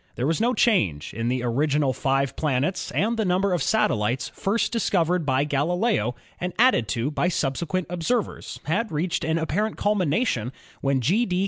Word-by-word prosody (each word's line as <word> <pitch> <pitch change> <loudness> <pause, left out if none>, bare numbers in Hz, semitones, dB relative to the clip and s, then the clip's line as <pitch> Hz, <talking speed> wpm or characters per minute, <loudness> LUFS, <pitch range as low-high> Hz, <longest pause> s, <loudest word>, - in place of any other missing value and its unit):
There 125 - -2
was 165 +7 0
no 245 +2 +2
change 95 - +1
in 115 +3 -3
the 125 0 -1
original 140 +3 +1
five 135 +1 0
planets 150 +5 -1
and 225 +4 0
the 220 - +1
number 185 0 +1
of 175 - 0
satellites 120 - +1
first 210 +4 -1
discovered 180 - +1
by 130 +1 +2
Galileo 150 - 0 0.2
and 180 0 -3
added 240 - +4
to 115 +8 -1
by 165 - 0
subsequent 170 +2 -1
observers 180 +7 -2
had 210 +8 -1
reached 170 +3 -1
an 160 +1 0
apparent 175 +7 -1
culmination 185 - 0 0.3
when 135 -1 +1
G. 200 - +2
D. 180 -1 0
165 Hz, 165 wpm, -24 LUFS, 135-195 Hz, 0.3 s, added